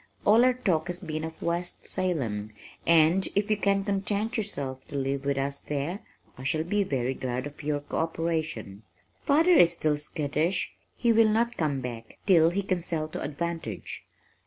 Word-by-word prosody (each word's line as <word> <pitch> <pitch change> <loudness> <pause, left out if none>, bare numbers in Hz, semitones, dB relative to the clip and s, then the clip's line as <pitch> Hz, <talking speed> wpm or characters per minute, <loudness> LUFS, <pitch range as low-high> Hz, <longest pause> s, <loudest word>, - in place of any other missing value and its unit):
"All 220 +4 +6
our 255 0 +4
talk 175 -10 0
has 175 0 -3
been 155 -2 -4
of 160 0 -6
West 175 +1 -2
Salem, 115 - -2 0.3
and 170 +3 +5
if 205 +1 +1
you 215 - +3
can 200 -1 +2
content 205 +3 -1
yourself 140 - -3
to - - -8
live 135 0 -1
with 140 -1 +1
us 140 +1 -2
there, 150 +7 -3 0.4
I - - -7
shall 155 +4 +1
be 205 +5 +1
very 130 -7 -1
glad 130 0 -3
of 145 +1 -8
your 145 -1 -1
co 145 - -5
operation. 160 -11 -2 0.4
Father 320 +5 +4
is 170 - +6
still 155 -3 0
skittish. 155 +4 -1 0.2
He 235 -1 +3
will 225 -1 +5
not 235 +2 +1
come 145 -5 0
back 115 -2 -7
till 165 -4 +6
he 195 +4 -1
can 185 -2 -1
sell 160 -2 -2
to - - -5
advantage. 160 - -4
160 Hz, 180 wpm, -28 LUFS, 140-195 Hz, 0.4 s, All